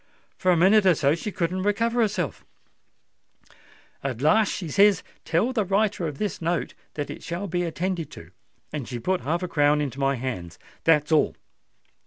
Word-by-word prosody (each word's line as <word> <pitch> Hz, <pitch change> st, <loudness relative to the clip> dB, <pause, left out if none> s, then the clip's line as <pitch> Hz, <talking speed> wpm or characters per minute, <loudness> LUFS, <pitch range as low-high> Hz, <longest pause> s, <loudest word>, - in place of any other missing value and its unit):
For 185 Hz, -, +2 dB
a 175 Hz, -, +4 dB
minute 195 Hz, +4 st, +5 dB
or 180 Hz, -, +6 dB
so 145 Hz, -1 st, +2 dB
she 170 Hz, +6 st, -4 dB
couldn't 185 Hz, +1 st, -1 dB
recover 230 Hz, +4 st, +1 dB
herself: 195 Hz, -, -1 dB, 1.6 s
at 130 Hz, -4 st, -3 dB
last 195 Hz, -, +3 dB
she 175 Hz, -, -4 dB
says, 200 Hz, +5 st, +4 dB, 0.2 s
'Tell 210 Hz, +10 st, +1 dB
the 220 Hz, -4 st, +1 dB
writer 195 Hz, -2 st, +1 dB
of 145 Hz, -3 st, -6 dB
this 205 Hz, -1 st, -3 dB
note 165 Hz, -5 st, -1 dB, 0.2 s
that 145 Hz, -1 st, -3 dB
it -, -, -8 dB
shall 175 Hz, +3 st, -4 dB
be 175 Hz, -2 st, -1 dB
attended 175 Hz, 0 st, -2 dB
to;'—and 100 Hz, -, -10 dB
she 125 Hz, -, -4 dB
put 185 Hz, +9 st, -1 dB
half 170 Hz, +4 st, -1 dB
a -, -, -1 dB
crown 145 Hz, -2 st, +3 dB
into 140 Hz, -2 st, -3 dB
my 135 Hz, 0 st, +2 dB
hand. 115 Hz, -10 st, -5 dB, 0.3 s
That's 150 Hz, -2 st, +3 dB
all." 155 Hz, -2 st, +3 dB
170 Hz, 175 wpm, -25 LUFS, 145-195 Hz, 1.6 s, or